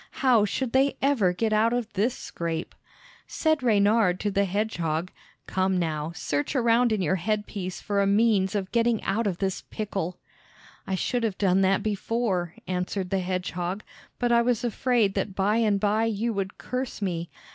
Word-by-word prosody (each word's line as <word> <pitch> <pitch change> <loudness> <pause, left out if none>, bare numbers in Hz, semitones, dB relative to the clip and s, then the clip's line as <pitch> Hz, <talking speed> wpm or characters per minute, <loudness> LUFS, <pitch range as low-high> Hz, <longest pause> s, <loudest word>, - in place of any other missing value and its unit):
How 235 -5 +5
should 250 +3 -2
they 270 +2 +2
ever 265 -10 +3
get 215 +4 0
out 225 +2 +3
of 245 -2 -2
this 215 +6 0
scrape? 165 -1 -4 0.5
Said 315 -3 +1
Reynard 205 -4 +3
to 205 - 0
the 200 +1 +2
hedgehog, 180 -4 -1 0.3
"Come 190 0 0
now, 160 -2 -2
search 145 - -2
around 235 -1 +3
in 210 -3 +1
your 185 +3 +1
head 210 +4 -1
piece 185 -2 -5
for 200 -1 0
a 200 - +2
means 205 -2 +3
of 190 -2 -2
getting 235 -1 +2
out 220 +2 0
of 185 -4 -1
this 190 -1 -2
pickle." 195 -5 -3 0.7
"I 190 - 0
should 245 +6 -1
have 215 -5 -1
done 195 -1 +3
that 195 0 +2
before," 205 -4 -1
answered 180 +1 -2
the 195 - +2
hedgehog, 180 +1 -3 0.3
"but 245 -1 0
I 235 0 +5
was 240 -1 +1
afraid 235 -3 +1
that 195 - -2
by 205 +3 +2
and 210 -3 +2
by 215 +2 +2
you 225 +1 -1
would 195 -1 -3
curse 255 0 -4
me. 175 -4 -2
205 Hz, 180 wpm, -26 LUFS, 185-230 Hz, 0.7 s, How